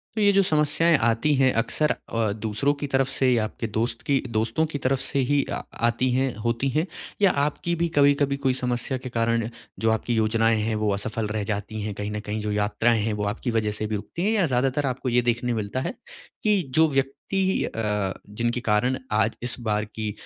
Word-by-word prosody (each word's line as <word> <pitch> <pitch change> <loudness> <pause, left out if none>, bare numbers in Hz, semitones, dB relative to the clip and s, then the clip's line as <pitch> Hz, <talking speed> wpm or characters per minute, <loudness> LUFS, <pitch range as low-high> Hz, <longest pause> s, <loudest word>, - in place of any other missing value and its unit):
तो 215 - 0
ये 205 -1 +6
जो 195 - +5
समस्याएँ 160 0 +3
आती 115 +5 +2
हैं 130 -1 +4
अक्सर 120 +7 +1
अ, 115 -2 -1
दूसरों 110 +6 0
की 145 0 -5
तरफ़ 135 -1 +2
से 135 -1 +2
या 115 -2 +2
आपके 115 +1 -4
दोस्त 115 +2 -2
की 140 - +2
अ, 130 - -7
दोस्तों 115 +7 +1
की 155 -2 -4
तरफ़ 135 -1 0
से 135 +1 -1
ही 145 -1 +3
अ, - - -2 0.3
आती 120 +2 +1
हैं 130 0 +1
होती 120 +3 0
हैं? 155 +5 +1 0.4
या 200 -3 +6
आपकी 150 +4 -1
भी 170 +1 +1
कभी-कभी 140 -1 +4
कोई 130 - +4
समस्या 125 +1 -1
के 130 0 -7
कारण 115 -1 0 0.3
जो 115 - +2
आपकी 110 +2 -1
योजनाएँ 110 0 +2
हैं 110 +1 -1
वो 105 -1 0
असफल 105 +2 -2
रह 105 0 -2
जाती 105 +1 -4
हैं 105 0 -3
कहीं 105 +1 -4
न 105 - -3
कहीं 105 0 -4
जो 105 0 -2
यात्राएँ 110 +2 +2
हैं 110 +1 0
वो 105 0 -3
आपकी 120 +2 -3
वजह 110 -2 0
से 105 +1 -3
भी 110 - -2
रुकती 165 - -5
हैं? 215 - +2
या 190 - +4
ज़्यादातर 135 +1 +1
आपको 130 0 -2
ये 125 0 +3
देखने 120 0 0
मिलता 110 +3 -2
है 140 - -3 0.5
कि 210 -3 +3
जो 160 0 +6
व्यक्ति 145 +8 0
अ, 105 -3 -1 0.2
जिनके 120 +3 -1
कारण 125 +5 +2
आज 110 +1 +2
इस 120 - -2
बार 105 0 +1
की 110 0 -4
120 Hz, 220 wpm, -25 LUFS, 110-140 Hz, 0.5 s, ये